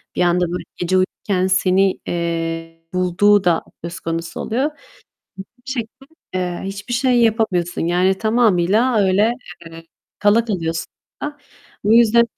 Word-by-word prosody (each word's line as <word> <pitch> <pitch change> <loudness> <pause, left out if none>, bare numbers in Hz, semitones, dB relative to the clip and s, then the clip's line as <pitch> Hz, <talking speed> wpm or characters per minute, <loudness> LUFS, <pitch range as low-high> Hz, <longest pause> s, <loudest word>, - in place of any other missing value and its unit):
bir - - 0
anda 175 0 +3
böyle 180 -1 -4
gece 185 +1 +1
uyurken 185 0 0
seni, 190 0 +2
eee, 165 -1 -3
bulduğu 185 +3 +3
da 170 -2 +2 0.2
söz 170 0 -6
konusu 165 0 -4
oluyor. 265 +7 -1 1.0
Bir 260 - -3
şekilde, 255 +2 -6 0.3
eee, 180 -1 -2
hiçbir 200 +5 -5
şey 250 0 +2
yapamıyorsun. 215 -7 +1
Yani 180 +2 +2
tamamıyla 220 +1 +2
öyle, 200 +5 +3 0.3
eee, 165 0 -10 0.4
kala 210 +3 +3
kalıyorsun 165 -6 -2 0.4
da. 295 0 -5 0.5
Bu 215 +2 +4
yüzden, 235 0 +6
190 Hz, 130 wpm, -19 LUFS, 175-225 Hz, 1.0 s, yüzden